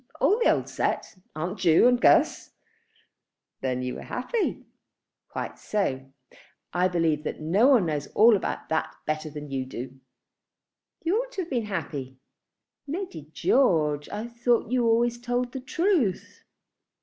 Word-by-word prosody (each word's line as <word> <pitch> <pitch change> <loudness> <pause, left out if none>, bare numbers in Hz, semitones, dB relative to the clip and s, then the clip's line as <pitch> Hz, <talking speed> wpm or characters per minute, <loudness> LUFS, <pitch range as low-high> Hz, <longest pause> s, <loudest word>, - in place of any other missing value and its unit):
"All 425 - +3
the 475 - +4
old - - -1
set. - - -2 0.2
Aunt 175 +6 -4
Ju 170 +6 +5
and 245 0 +3
Guss." - - +4 1.1
"Then 125 -1 -2
you 125 - -3
were - - -7
happy." 395 - -2 0.6
"Quite - - -5
so. 135 -11 -2 0.6
I 180 +1 +3
believe 165 -4 0
that - - -4
no 180 +11 +3
one 250 -9 +5
knows 150 -3 -2
all 225 +1 +7
about 195 - -3
that 160 - -1
better 155 0 -2
than 150 -1 -8
you 135 -1 -1
do." 130 +1 -8 1.0
"You 345 +6 +2
ought - - -9
to 385 - -2
have 335 - -12
been 240 -4 0
happy." 145 -9 -5 0.7
"Lady 280 - -5
George, 155 - +2
I 210 +3 -4
thought 235 -1 0
you 245 -2 +2
always 235 +1 +2
told 245 0 -1
the 265 - -5
truth." 310 - 0
200 Hz, 150 wpm, -26 LUFS, 150-245 Hz, 1.1 s, all